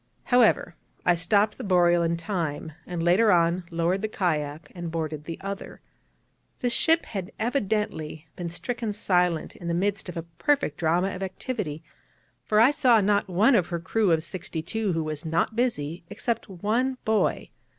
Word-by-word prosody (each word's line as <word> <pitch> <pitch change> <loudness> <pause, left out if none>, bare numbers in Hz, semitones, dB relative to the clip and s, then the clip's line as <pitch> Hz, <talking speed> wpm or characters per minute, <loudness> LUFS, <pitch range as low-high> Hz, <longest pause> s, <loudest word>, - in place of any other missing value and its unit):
However, 240 -7 +3 0.3
I 175 - +5
stopped 200 +5 +2
the - - -5
Boreal 175 -3 +4
in 170 0 +1
time, 165 -4 -3 0.2
and 175 -2 -3
later 195 +6 +4
on 175 0 +2
lowered 170 +3 0
the 215 - 0
kayak, 155 -6 -2
and 175 -2 -5
boarded 155 -2 -4
the 165 0 -5
other. 195 0 -6 0.8
This 245 -1 0
ship 325 +5 +3
had 195 -2 -5
evidently 210 - -2
been 175 -1 -4
stricken 230 +5 -3
silent 180 -5 +1
in 170 - -8
the 170 - 0
midst 195 +1 -1
of 175 - -6
a 165 - -3 0.2
perfect 285 - +1
drama 175 +4 +1
of 185 - -7
activity, 190 - -4 0.6
for 215 - +2
I 235 +5 +7
saw 250 -6 +4
not 205 0 +2
one 205 +9 +4
of 185 -8 +3
her 170 -2 -3
crew 200 +3 +1
of 160 -1 +2
sixty 170 -2 -5
two 210 +2 -1
who 165 -1 0
was 155 -1 -4
not 165 +6 0
busy, 175 - -1
except 225 +3 -3
one 225 +8 0
boy. 220 -1 +1
180 Hz, 170 wpm, -26 LUFS, 165-215 Hz, 0.8 s, I